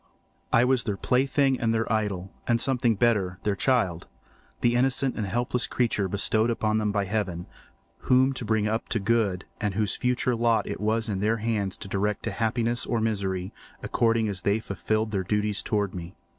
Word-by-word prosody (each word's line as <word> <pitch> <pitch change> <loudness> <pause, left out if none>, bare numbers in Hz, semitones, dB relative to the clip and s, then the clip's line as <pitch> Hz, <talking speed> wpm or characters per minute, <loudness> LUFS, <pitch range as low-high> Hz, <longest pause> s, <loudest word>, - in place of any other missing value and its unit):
I 120 - +5
was 130 -1 +2
their 105 -3 -2
plaything 135 +3 +2
and 115 -1 +1
their 115 -1 0
idol, 100 -4 -2
and 115 -1 +2
something 120 -3 +2
better—their 100 -3 +1
child, 100 -8 +1 0.5
the 120 - +3
innocent 130 +1 +1
and 105 -3 -2
helpless 120 +4 0
creature 115 -5 0
bestowed 110 +4 0
on 110 0 +2
them 105 -1 0
by 100 -1 0
Heaven, 95 -4 -2 0.6
whom 130 +1 +5
to 130 - -5
bring 110 -1 +1
up 110 +1 -2
to 115 - 0
good, 100 -3 0
and 105 -3 -2
whose 105 -1 +1
future 125 0 0
lot 115 0 +2
it - - -5
was 110 +2 0
in 100 -3 -2
their 110 +3 +1
hands 105 -4 -2
to - - -8
direct 100 +1 -1
to - - -2
happiness 120 +1 -1
or 120 - 0
misery, 95 -4 -2 0.3
according 115 -1 +1
as 100 -3 -3
they 100 +4 +1
fulfilled 110 +2 -2
their 100 -2 0
duties 105 +1 0
towards 105 -3 -1
me. 90 0 -7
110 Hz, 185 wpm, -26 LUFS, 100-120 Hz, 0.6 s, I